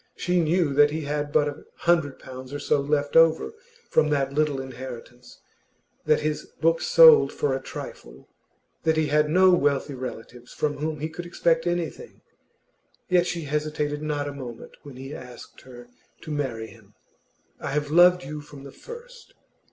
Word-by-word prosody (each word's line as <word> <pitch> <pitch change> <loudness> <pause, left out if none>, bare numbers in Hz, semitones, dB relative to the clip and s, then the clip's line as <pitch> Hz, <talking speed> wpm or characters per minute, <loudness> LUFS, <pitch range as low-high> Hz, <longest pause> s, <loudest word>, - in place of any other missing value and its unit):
She 180 0 0
knew 165 -2 +1
that 145 +1 +5
he 155 +2 -3
had 145 0 -3
but 150 0 +3
a 145 0 -6
hundred 165 -6 +1
pounds 130 0 -10
or 145 - -4
so 145 0 +1
left 145 0 -1
over 165 - +4 0.4
from 155 -1 +3
that 140 -2 0
little 150 -2 +1
inheritance, 125 -2 -10 0.7
that 155 - +3
his 150 0 -2
books 165 +1 +1
sold 480 -3 +8
for 445 - -1
a - - -2
trifle, - - -10 0.5
that 160 -1 +1
he 155 -2 +1
had 150 +1 +2
no 185 +3 +5
wealthy 145 -4 +1
relatives 125 -1 -8
from 150 -1 -2
whom 155 0 -3
he 155 - -1
could 175 +2 -8
expect 165 -1 +1
anything; 175 - -4 0.9
yet 180 -1 +3
she 170 -2 -3
hesitated 150 0 -2
not 150 -1 -2
a 145 - -5
moment 125 -5 -9
when 140 -3 -12
he 135 +3 -8
asked 125 -4 -11
her 120 -2 -13 0.3
to 155 - -8
marry 130 -7 -3
him. - - -17 0.6
'I - - -5
have 145 +1 -2
loved 180 +2 +6
you 150 +2 -7
from 145 -1 -13
the 140 - -10
first. 480 - -12
150 Hz, 170 wpm, -25 LUFS, 140-165 Hz, 0.9 s, sold